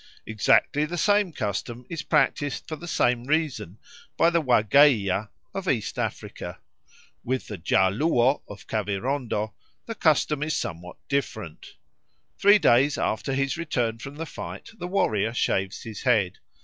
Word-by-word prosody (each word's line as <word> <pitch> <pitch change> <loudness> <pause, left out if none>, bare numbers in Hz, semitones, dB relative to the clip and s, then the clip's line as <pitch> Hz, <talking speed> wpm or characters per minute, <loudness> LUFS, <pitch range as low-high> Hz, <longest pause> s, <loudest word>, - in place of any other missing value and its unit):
Exactly 110 +6 +2
the 175 +3 -5
same 205 +1 +3
custom 115 0 -4
is 165 0 -4
practised 145 -1 0
for 155 - -4
the 175 +3 -10
same 120 -6 +1
reason 135 - -1 0.4
by 165 - +4
the 170 -1 +2
Wageia 110 -5 +4 0.2
of 195 -2 -3
East 115 -5 -1
Africa. - - -5 0.7
With 130 +1 -2
the 105 -5 -8
Ja 95 +1 +3
Luo 130 - +2
of 105 - -11
Kavirondo 110 +1 -2 0.3
the 230 - -4
custom 150 - +2
is 155 0 -1
somewhat 90 +1 -5
different. 110 - -4 0.6
Three 205 +1 +7
days 135 -3 +4
after 120 +5 -1
his 135 0 0
return 120 -9 -1
from 140 +4 -8
the 165 +2 -5
fight - - -8
the 175 - -4
warrior 115 - 0
shaves 95 -4 -1
his 110 -2 -7
head. 105 -8 +1
125 Hz, 145 wpm, -25 LUFS, 110-155 Hz, 0.7 s, Three